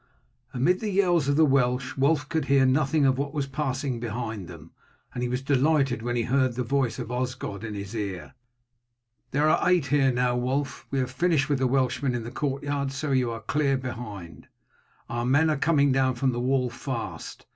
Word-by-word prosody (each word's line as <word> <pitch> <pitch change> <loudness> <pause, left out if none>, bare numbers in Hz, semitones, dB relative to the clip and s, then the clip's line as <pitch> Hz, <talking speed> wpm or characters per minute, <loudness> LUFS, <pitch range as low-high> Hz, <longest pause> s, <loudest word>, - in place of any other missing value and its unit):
Amid 170 +9 +1
the 215 - -3
yells 175 -6 +2
of 140 - +2
the 160 +1 +5
Welsh 130 -2 +1
Wulf 145 +2 +2
could 160 -3 -1
hear 140 -1 +4
nothing 140 +2 +2
of 130 0 +2
what 140 +1 -3
was 145 -2 0
passing 135 -2 -2
behind 115 -4 -4
them, 85 -2 -12 0.4
and 125 - -4
he 125 - -1
was 125 +2 -2
delighted 140 -3 +2
when 120 +1 -2
he 120 - +1
heard 130 0 +1
the 125 - -1
voice 125 -2 0
of 115 - -5
Osgod 125 -5 -4
in 110 -2 -5
his 100 0 -6
ear. 95 -7 -5 1.0
"There 145 +3 +2
are 155 - +3
eight 180 -5 +3
here 140 -1 +3
now, 125 0 +1
Wulf; 130 +3 -2
we 135 - -2
have 130 -1 -1
finished 155 -1 +1
with 145 -3 +1
the 130 - +2
Welshmen 130 0 0
in 120 - -3
the 115 - -7
courtyard, 140 -1 -2
so 140 +2 -3
you 130 -3 +2
are 115 -1 -5
clear 140 +4 +1
behind. 105 - -7 0.6
Our 120 +1 -3
men 145 +6 +3
are - - +1
coming 145 -2 +3
down 130 -1 +2
from 130 +2 +1
the 120 - -3
wall 125 0 +1
fast. 120 -1 -6
130 Hz, 200 wpm, -26 LUFS, 120-140 Hz, 1.0 s, the